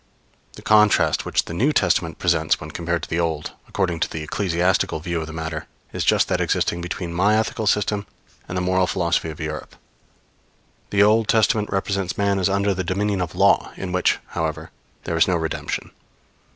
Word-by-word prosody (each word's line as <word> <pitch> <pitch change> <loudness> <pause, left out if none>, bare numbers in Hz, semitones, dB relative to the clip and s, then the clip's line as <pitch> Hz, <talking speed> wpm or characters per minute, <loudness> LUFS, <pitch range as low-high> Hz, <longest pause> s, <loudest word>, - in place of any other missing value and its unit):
The - - -13
contrast 105 -1 +4
which - - 0
the - - -7
New 130 - +2
Testament 85 - +1
presents 85 -3 +1
when - - -8
compared 85 0 -2
with - - -7
the 85 - 0
Old, 80 -3 -2 0.2
according 90 -4 -1
to - - 0
the 80 - -5
ecclesiastical 90 0 0
view 85 +1 -3
of 80 - -6
the - - -7
matter, 80 -1 -5 0.3
is - - -2
just - - +3
that - - 0
existing 85 - 0
between 90 0 -4
my 100 +5 +3
ethical 110 0 -1
system 105 0 +1 0.4
and 90 - -4
the 90 - 0
moral 95 0 +2
philosophy 85 -2 0
of 75 - -8
Europe. 75 0 -5 1.1
The 100 0 +4
Old 110 +1 +4
Testament 110 -1 +2
represents 95 -2 -1
man 100 -1 +1
as 95 - +2
under 100 +1 +1
the 95 0 -2
dominion 100 +2 -1
of 90 - -4
Law, - - +3
in 95 -1 -5
which, 90 0 +2
however, - - -3 0.3
there 85 - -2
is 80 - +4
no 90 - +2
redemption. 80 -1 -3
90 Hz, 190 wpm, -22 LUFS, 85-100 Hz, 1.1 s, contrast